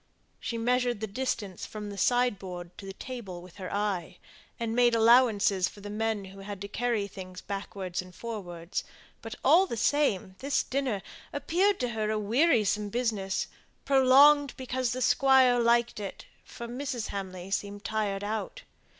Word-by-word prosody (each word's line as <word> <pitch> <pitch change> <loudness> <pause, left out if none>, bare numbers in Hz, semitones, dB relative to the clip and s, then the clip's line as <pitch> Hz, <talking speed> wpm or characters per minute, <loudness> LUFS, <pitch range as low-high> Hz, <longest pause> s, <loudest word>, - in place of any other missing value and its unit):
She 235 - -4
measured 245 0 +1
the 220 - -2
distance 210 -4 -3
from 210 -1 -6
the - - -7
sideboard 190 -8 0
to 195 - -8
the 195 - -6
table 210 -6 -7
with 180 +1 -14
her 185 -2 -6
eye, 190 -4 -2 0.4
and 230 -1 -2
made 240 -1 +4
allowances 225 -5 +4
for 205 - -14
the 205 0 -7
men 215 -1 -1
who 195 +1 -12
had 200 0 -7
to 200 - -4
carry 230 -1 -1
things 185 -2 -9
backwards 195 -2 -4
and 180 -1 -14
forwards; 180 -6 -5 0.4
but, - - -7
all 375 +3 +6
the 235 - -4
same, 210 -8 +1
this 280 +1 +1
dinner 255 -7 -2 0.3
appeared 370 +7 +1
to 250 - 0
her 215 -2 -2
a 215 - 0
wearisome 215 -2 +2
business, 210 -4 -1 0.4
prolonged 275 +1 +6
because 255 -1 -2
the 255 0 -1
Squire 255 0 +5
liked 235 -1 +2
it, 200 -2 -7 0.2
for 235 - -8
Mrs. 250 -1 -4
Hamley 190 -2 -6
seemed 205 +1 -3
tired 205 -3 -1
out. 220 - -4
220 Hz, 160 wpm, -29 LUFS, 195-250 Hz, 0.4 s, all